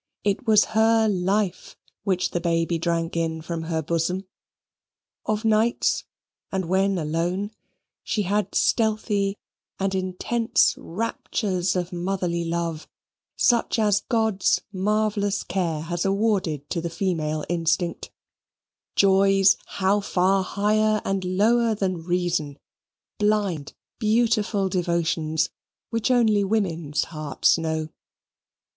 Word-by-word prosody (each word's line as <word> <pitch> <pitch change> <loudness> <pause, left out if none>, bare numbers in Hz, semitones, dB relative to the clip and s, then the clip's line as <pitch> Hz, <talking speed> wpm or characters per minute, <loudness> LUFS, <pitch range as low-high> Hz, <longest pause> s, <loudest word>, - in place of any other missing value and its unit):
It 205 +5 -1
was 215 -1 +6
her 225 0 +4
life 195 -1 -1 0.3
which 185 -3 0
the 175 - -2
baby 165 0 0
drank 165 0 -1
in 165 -1 -1
from 165 0 -4
her 160 -1 -2
bosom. 170 +4 -1 1.0
Of 215 +1 -1
nights, 220 +2 +2 0.5
and 190 -2 -1
when 190 +2 +1
alone, 175 +6 -1 0.5
she 210 - -1
had 205 +1 -1
stealthy 210 -3 +1 0.4
and 195 0 0
intense 190 +6 +1
raptures 190 -1 -2
of 180 0 -2
motherly 175 -1 -1
love, 165 -1 -3 0.5
such 235 -1 +2
as 210 -2 +3
God's 220 -5 +1
marvellous 205 +1 0
care 170 -5 -2
has 170 +2 -3
awarded 195 -7 0
to 170 - -1
the 170 - -3
female 160 -4 -2
instinct 170 0 -1 0.9
joys 195 0 +5
how 195 +1 +1
far 190 0 +2
higher 215 +2 +1
and 195 -1 -1
lower 220 +5 +2
than 185 -4 -2
reason 175 -5 -1 0.6
blind 205 -8 0 0.2
beautiful 215 -3 +2
devotions 170 -3 0 0.4
which 230 +1 0
only 220 -5 +3
women's 170 -8 0
hearts 155 +1 +1
know. 160 -1 -2
190 Hz, 110 wpm, -24 LUFS, 170-210 Hz, 1.0 s, was